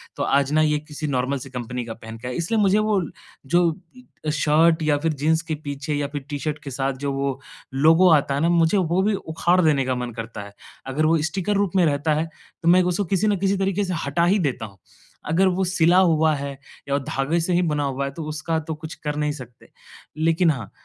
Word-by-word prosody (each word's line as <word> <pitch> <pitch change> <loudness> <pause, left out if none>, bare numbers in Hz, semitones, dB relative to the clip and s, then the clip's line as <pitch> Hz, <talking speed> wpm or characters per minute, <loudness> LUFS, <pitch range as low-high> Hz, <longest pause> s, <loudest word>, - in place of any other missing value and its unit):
तो - - -2
आज 140 0 +2
ना 155 - +4
ये 150 -1 +2
किसी 150 0 -6
नॉर्मल 135 0 0
सी 135 +1 -9
कंपनी 125 -1 -5
का 115 - -6
पहन 110 0 -10
के 115 - -8
आया - - -3
है। - - -4
इसलिए 175 +7 0
मुझे 200 +1 +4
वो 215 -2 +1 0.4
जो 175 +6 +3 0.7
शर्ट 160 +2 +3
या 150 -1 +2
फिर 160 +2 -1
जीन्स 155 +3 +1
के 155 - 0
पीछे 145 +2 -4
या 145 -1 -1
फिर 145 - -3
टी-शर्ट 150 +1 -3
के 140 - -7
साथ 135 +1 -1
जो 140 - 0
वो 135 -1 -2 0.3
लोगो 160 +6 +5
आता 140 -2 +2
है 140 - -1
ना 165 - +3
मुझे 170 +3 +3
वो 180 0 +1
भी 210 +1 +2
उखाड़ 175 0 0
देने 150 -5 +2
का 130 0 0
मन 125 -1 -4
करता 115 -1 -7
है। 100 - -13 0.3
अगर 145 +4 0
वो 165 +1 +4
स्टिकर 195 +3 -1
रूप 200 -2 +1
में 180 -2 +4
रहता 150 +1 +1
है 155 +2 0 0.4
तो - - -1
मैं 180 +1 +6
उसको 180 +3 0
किसी 200 +3 +1
न 205 - +3
किसी 195 +1 +1
तरीके 195 +1 0
से 185 - -3
हटा 145 +5 +1
ही 195 +4 +3
देता 135 -9 -1
हूँ। 100 -3 -13 0.5
अगर 175 +5 +3
वो 185 +1 +1
सिला 175 -1 +3
हुआ 160 -4 +3
है 140 -1 -5 0.3
या 140 - +2
धागे 135 +4 -1
से 180 +2 -1
ही 175 - +3
बना 150 -4 0
हुआ 140 0 -2
है 140 - -4
तो 160 - -6
उसका 160 +1 -2
तो 160 0 -5
कुछ 155 +1 -8
कर 150 -1 -4
नहीं 150 0 0
सकते। 125 -5 -11 0.5
लेकिन 165 +1 +3
हाँ, 115 -8 -6
155 Hz, 240 wpm, -23 LUFS, 140-175 Hz, 0.7 s, मैं